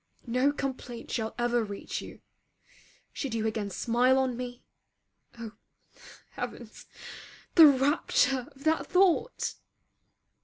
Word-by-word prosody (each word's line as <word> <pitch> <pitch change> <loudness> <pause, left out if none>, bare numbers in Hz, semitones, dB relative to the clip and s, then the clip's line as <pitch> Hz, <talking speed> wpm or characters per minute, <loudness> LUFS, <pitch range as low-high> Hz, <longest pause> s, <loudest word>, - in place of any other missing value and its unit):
No 255 +4 +2
complaint 260 -4 -5
shall 220 -2 -2
ever 240 -1 +1
reach 200 -2 -5
you. - - -11 0.9
Should 265 -5 -4
you 220 -1 -1
again 215 -2 -2
smile 240 +6 +2
on 260 -2 +1
me 245 0 -7 0.7
oh 230 -2 -7 0.8
heavens! - - -8 0.7
the 325 -3 +10
rapture 270 -2 +2
of 275 - -15
that 320 +1 +1
thought! 380 +6 +2
250 Hz, 110 wpm, -29 LUFS, 230-275 Hz, 0.9 s, the